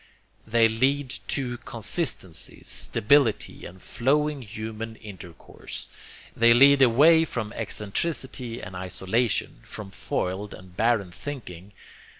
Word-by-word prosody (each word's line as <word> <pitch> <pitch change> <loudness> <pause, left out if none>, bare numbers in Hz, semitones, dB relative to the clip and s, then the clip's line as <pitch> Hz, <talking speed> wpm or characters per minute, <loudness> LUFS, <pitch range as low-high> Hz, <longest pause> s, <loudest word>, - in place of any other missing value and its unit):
They 115 +1 +5
lead 130 +4 +1
to 125 -4 -2
consistency, 110 - -3
stability 125 0 +1
and 90 +2 -13
flowing 145 +7 0
human 110 0 -6
intercourse. 95 -6 -10 0.5
They 115 0 +6
lead 140 +2 +7
away 150 +7 +6
from 120 -9 -4
excentricity 125 +1 -3
and 95 0 -9
isolation, 95 +5 -1
from 105 -3 -9
foiled 95 +2 -3
and 90 -1 -15
barren 110 -5 +1
thinking. 100 -7 -7
115 Hz, 105 wpm, -26 LUFS, 100-130 Hz, 0.5 s, lead